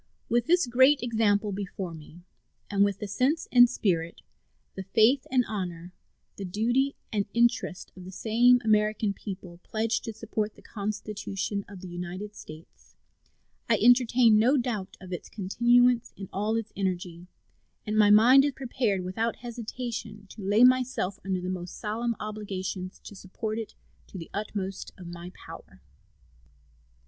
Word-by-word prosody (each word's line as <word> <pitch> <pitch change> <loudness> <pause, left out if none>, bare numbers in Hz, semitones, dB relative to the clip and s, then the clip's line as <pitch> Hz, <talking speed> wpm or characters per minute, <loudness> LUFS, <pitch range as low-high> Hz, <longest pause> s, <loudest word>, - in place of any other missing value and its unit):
With 240 0 +1
this 355 -1 +4
great 260 +3 +4
example 215 -3 +1
before 190 -2 -5
me, 160 +2 -12 0.5
with 200 -1 +3
the 210 - -5
sense 255 - 0
and 245 -1 +7
spirit, 170 -8 -1 0.5
the 190 - -6
faith 220 +7 +3
and 250 -2 +2
honor, 180 -4 -5 0.4
the 200 - -5
duty 240 +9 0 0.2
and 205 -2 0
interest, 235 -5 +1
of 185 - -11
the 185 - -8
same 235 +6 +4
American 215 -1 +2
people 185 -4 -8
pledged 220 +2 -1
to 225 - -5
support 215 -1 -3
the - - -18
Constitution 205 -1 -4
of 200 -3 -11
the 185 - -8
United 180 +4 -6
States, 155 +1 -13 0.7
I 230 - +5
entertain 240 -1 +5
no 255 +6 +4
doubt 230 -6 -3
of 185 -1 -9
its 175 - -6
continuance 240 +4 +2
in 195 - -7
all 210 +3 0
its 225 -1 -3
energy, 180 -2 -3 0.6
and 215 -1 -2
my 210 -1 +5
mind 240 +6 +7
is 285 -1 0
prepared 245 -7 -1
without 220 +6 -2
hesitation 230 -3 -6
to 215 - -11
lay 205 +4 +3
myself 250 -6 +3
under 190 -1 -2
the 180 - -5
most 180 -1 -5
solemn 230 +2 -2
obligations 195 -3 -5
to - - -10
support 215 +4 -5
it 225 - -7 0.3
to - - -10
the 165 - -9
utmost 200 -2 -4
of 180 - -11
my 175 +1 -8
power. - - -12
210 Hz, 150 wpm, -27 LUFS, 190-235 Hz, 0.7 s, and